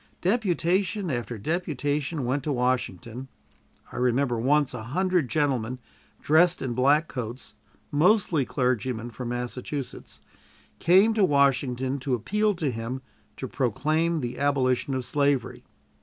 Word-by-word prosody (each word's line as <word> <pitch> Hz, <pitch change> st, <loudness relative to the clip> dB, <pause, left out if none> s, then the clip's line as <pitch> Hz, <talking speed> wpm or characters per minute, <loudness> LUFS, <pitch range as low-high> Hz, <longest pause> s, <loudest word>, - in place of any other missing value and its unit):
Deputation 190 Hz, -2 st, +1 dB
after 120 Hz, -2 st, -3 dB
deputation 145 Hz, -, -2 dB
went 135 Hz, +4 st, 0 dB
to 150 Hz, -, -1 dB
Washington. 125 Hz, -2 st, -2 dB, 0.6 s
I -, -, -8 dB
remember 125 Hz, 0 st, +1 dB
once 140 Hz, +2 st, +2 dB
a 125 Hz, -, -5 dB
hundred 175 Hz, +4 st, 0 dB
gentlemen, 130 Hz, -6 st, 0 dB, 0.5 s
dressed 170 Hz, +4 st, +4 dB
in 130 Hz, -3 st, -3 dB
black 145 Hz, +6 st, +3 dB
coats, 125 Hz, 0 st, -6 dB, 0.4 s
mostly 170 Hz, -1 st, +3 dB
clergymen, 125 Hz, -2 st, -1 dB
from 120 Hz, +2 st, -6 dB
Massachusetts, 125 Hz, +3 st, -5 dB, 0.6 s
came 190 Hz, +6 st, +5 dB
to 215 Hz, -2 st, +2 dB
Washington 135 Hz, -3 st, +2 dB
to 130 Hz, -1 st, 0 dB
appeal 210 Hz, -, 0 dB
to 155 Hz, -6 st, -1 dB
him 120 Hz, +3 st, -5 dB, 0.3 s
to 130 Hz, -, -4 dB
proclaim 155 Hz, -, 0 dB
the 120 Hz, 0 st, -4 dB
abolition 135 Hz, -2 st, +1 dB
of 130 Hz, -1 st, -3 dB
slavery. 140 Hz, -1 st, 0 dB
135 Hz, 125 wpm, -26 LUFS, 125-160 Hz, 0.6 s, came